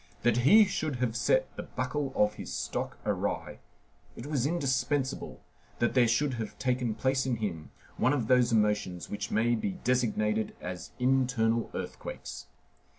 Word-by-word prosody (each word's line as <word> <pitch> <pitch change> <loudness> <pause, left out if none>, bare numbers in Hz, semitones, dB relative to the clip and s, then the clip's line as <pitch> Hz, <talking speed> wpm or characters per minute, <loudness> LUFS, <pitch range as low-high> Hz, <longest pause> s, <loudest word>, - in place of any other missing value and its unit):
That 120 0 +3
he 205 - +7
should 155 -7 -2
have 120 -2 -1
set - - +1
the - - -2
buckle 145 -2 -3
of 105 0 +3
his - - -8
stock - - -3
awry, - - -2 0.6
it - - -8
was 140 -3 0
indispensable 140 -3 -1 0.4
that 120 - +1
there 125 -2 +5
should 130 +5 +1
have 110 - -6
taken 125 -3 0
place 130 0 +1
in 125 - +1
him 95 -8 -4 0.3
one 130 - +3
of 135 -6 0
those 125 -1 +4
emotions 105 -5 0
which 105 - -3
may 115 +2 +2
be 155 - -1
designated 110 -3 +1
as 90 0 -6
internal 125 -3 +2
earthquakes. - - -6
125 Hz, 150 wpm, -30 LUFS, 110-135 Hz, 0.6 s, he